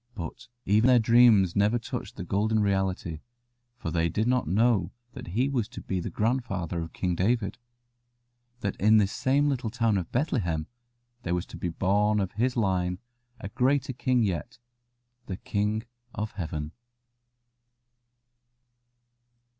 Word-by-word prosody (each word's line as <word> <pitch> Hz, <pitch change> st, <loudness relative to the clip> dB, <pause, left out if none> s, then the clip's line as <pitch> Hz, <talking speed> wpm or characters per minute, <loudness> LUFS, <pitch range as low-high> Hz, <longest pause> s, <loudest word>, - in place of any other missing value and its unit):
But 85 Hz, +6 st, -7 dB, 0.2 s
even 110 Hz, +4 st, +4 dB
their 125 Hz, -1 st, +6 dB
dreams 115 Hz, -5 st, +5 dB
never 105 Hz, +4 st, +3 dB
touched 115 Hz, -, -6 dB
the -, -, -5 dB
golden 105 Hz, +5 st, +1 dB
reality, 95 Hz, -5 st, 0 dB, 0.6 s
for 85 Hz, -, -4 dB
they 85 Hz, 0 st, +1 dB
did 110 Hz, +5 st, 0 dB
not 125 Hz, -7 st, +1 dB
know 105 Hz, +3 st, +2 dB, 0.2 s
that -, -, -9 dB
he 115 Hz, +10 st, +1 dB
was 125 Hz, -6 st, -1 dB
to 120 Hz, -, -9 dB
be 95 Hz, -, -2 dB
the 85 Hz, -, -4 dB
grandfather 105 Hz, -8 st, -1 dB
of 80 Hz, -, -6 dB
King 90 Hz, -1 st, -1 dB
David, 105 Hz, +5 st, 0 dB, 1.0 s
that 100 Hz, -2 st, -2 dB
in 110 Hz, +3 st, +5 dB
this 100 Hz, -2 st, +3 dB
same 140 Hz, +3 st, +2 dB
little 130 Hz, -5 st, -1 dB
town 115 Hz, -3 st, +1 dB
of 85 Hz, -, -6 dB
Bethlehem 100 Hz, -, 0 dB, 0.6 s
there 85 Hz, -3 st, -1 dB
was 90 Hz, -, -2 dB
to -, -, -11 dB
be 85 Hz, +1 st, -3 dB
born 105 Hz, +4 st, +2 dB
of 95 Hz, -2 st, -1 dB
his 125 Hz, +4 st, 0 dB
line 90 Hz, -4 st, +1 dB, 0.4 s
a 95 Hz, -, -6 dB
greater 130 Hz, +3 st, +1 dB
King 125 Hz, -1 st, +1 dB
yet, 100 Hz, +5 st, -3 dB, 0.7 s
the 95 Hz, -, -4 dB
King 105 Hz, +2 st, -1 dB, 0.3 s
of 105 Hz, +2 st, -3 dB
Heaven. 80 Hz, -, -4 dB
105 Hz, 145 wpm, -27 LUFS, 90-120 Hz, 1.0 s, their